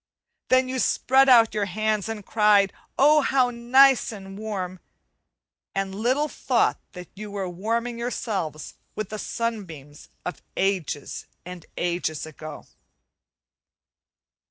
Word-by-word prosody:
Then 255 0 +4
you 260 0 -2
spread 265 +2 +3
out 230 -3 +6
your 210 -1 0
hands 215 +2 -1
and 215 -3 -5
cried, 210 -3 +4 0.2
"Oh, 300 +2 +6
how 260 -3 +2
nice 250 +2 +4
and 195 -2 -9
warm!" 195 -4 -5 1.0
and 195 0 -2
little 255 +9 +1
thought - - +1
that 180 -1 -9
you 210 +1 -8
were 200 -2 -3
warming 230 +6 -2
yourself 195 - -3 0.2
with 215 -3 -4
the 215 - -5
sunbeams 175 - -5 0.2
of 180 - -5 0.2
ages 185 -7 -2 0.2
and 180 -2 -9
ages 175 -3 -2
ago. 155 -1 -9
210 Hz, 120 wpm, -25 LUFS, 180-235 Hz, 1.0 s, out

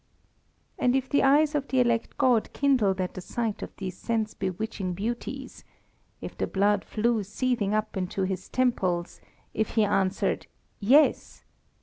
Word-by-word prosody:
And 250 +1 +3
if 265 -1 0
the 285 - +3
eyes 290 +3 +4
of 285 -2 -1
the 260 - +1
elect 235 -2 +1
god 245 -4 +2
kindled 240 -9 +2
at 185 -1 -2
the 185 - -7
sight 225 +3 -3
of - - -5
these 185 -2 -5
sense 220 +1 -2
bewitching 190 -1 -3
beauties; 240 +6 -5 0.6
if - - -7
the - - -2
blood 205 +1 +2
flew 230 0 0
seething 210 0 -1
up 215 0 -2
into 190 +1 -2
his 190 0 -3
temples; 190 -9 0 0.3
if 220 0 -2
he 220 - +4
answered 195 -2 0 0.3
"Yes!" 270 +9 +3
220 Hz, 150 wpm, -27 LUFS, 195-250 Hz, 0.6 s, eyes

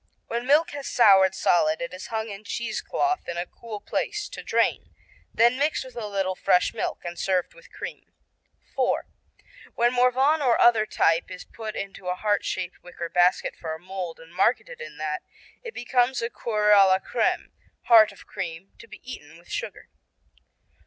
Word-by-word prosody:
When 235 +2 -4
milk 310 +5 +4
has 285 -1 -6
soured 190 -5 +5
solid 160 -4 +2
it 170 +1 -5
is 185 - -8
hung 220 -1 -3
in 200 0 -8
cheesecloth 360 - -2
in 170 - -4
a 175 - -2
cool 220 0 -9
place 420 - -3
to - - -8
drain, - - 0 0.4
then 240 +3 +3
mixed 290 -2 0
with 260 - -12
a 230 -3 -4
little 195 -2 -1
fresh 180 0 +2
milk - - -4
and 175 0 -6
served 185 -2 0
with - - -18
cream. - - -8 0.6
IV. - - +1 0.7
When 240 +1 +2
Morvan 260 +5 +3
or 250 -4 +3
other 225 -3 +5
type 165 -3 +2
is 185 -1 -9
put 220 -2 -7
into 195 -1 -6
a 180 - 0
heart 205 +1 0
shaped 180 0 -4
wicker 170 -1 -7
basket 180 +1 +2
for 160 -1 -5
a - - -11
mold, 180 -2 -6
and 165 +1 -15
marketed 360 - 0
in 480 - -9
that, 155 -1 -3 0.4
it 470 -2 -9
becomes 245 +1 +1
Coeur 210 -3 +1
à 200 -2 +8
la 190 0 +4
Crème, 190 - -1 0.3
heart 225 -3 +7
of - - -16
cream, 185 -2 -6
to 230 - -13
be 215 0 -13
eaten 160 -11 -10
with 170 - -20
sugar. - - -5
210 Hz, 180 wpm, -25 LUFS, 180-245 Hz, 0.7 s, à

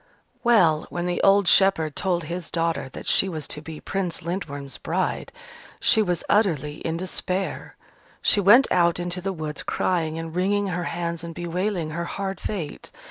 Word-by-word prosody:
Well, 175 -11 +4
when 175 0 -3
the 180 0 -1
old 195 -1 +5
shepherd 165 -7 +4
told 180 -3 0
his 170 +2 -5
daughter 165 -5 -1
that - - -9
she 195 - +3
was 155 -5 -5
to 150 - -2
be 160 -1 -8
Prince 185 -5 -3
Lindworm's 145 -6 -5
bride, - - -2 0.5
she 220 - +5
was 180 -4 0
utterly 155 -8 +1
in 165 0 -3
despair. 185 +1 -3 0.4
She - - +3
went 210 +7 +7
out 170 -1 +3
into 175 +1 -1
the 195 +2 -2
woods, 155 -4 -5
crying 165 -3 -1
and 165 0 -6
wringing 200 +2 +1
her 175 -1 -2
hands 170 0 -3
and 165 -1 -7
bewailing 175 -1 -2
her 170 +2 -3
hard 195 +1 -4
fate. 180 -8 -5
175 Hz, 170 wpm, -24 LUFS, 160-195 Hz, 0.5 s, went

